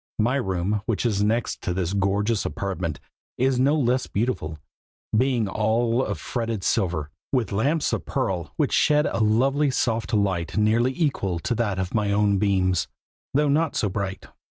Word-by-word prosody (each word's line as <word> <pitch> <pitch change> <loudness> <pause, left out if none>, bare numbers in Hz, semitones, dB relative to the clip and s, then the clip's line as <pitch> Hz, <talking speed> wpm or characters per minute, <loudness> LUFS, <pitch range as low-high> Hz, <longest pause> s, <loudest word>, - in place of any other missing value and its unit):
My 120 +5 +2
room, 95 -3 -1
which 115 +1 -1
is 105 -4 +1
next 110 +3 0
to 90 -3 -2
this 90 0 -1
gorgeous 100 +2 +1
apartment, 90 -6 -3 0.4
is 130 0 +2
no 140 +4 +4
less 130 -3 +1
beautiful, 100 -8 -2 0.6
being 120 -2 +2
all 115 +4 +1
of - - -3
fretted 115 -5 -3
silver, 85 -9 0 0.2
with 125 -5 0
lamps 140 +10 +1
of - - -1
pearl, 85 -6 -2
which - - +1
shed 150 0 +4
a - - -1
lovely 135 +7 +3
soft 115 -3 -1
light 95 -6 0
nearly 115 +5 +2
equal 100 - 0
to 120 - -1
that 110 -5 -1
of 95 -1 -3
my 105 -2 +1
own 100 -1 +2
beams, 95 -4 +1 0.5
though 150 +1 +3
not 155 +3 +1
so 105 - +1
bright. 95 0 -4
110 Hz, 165 wpm, -24 LUFS, 95-125 Hz, 0.6 s, no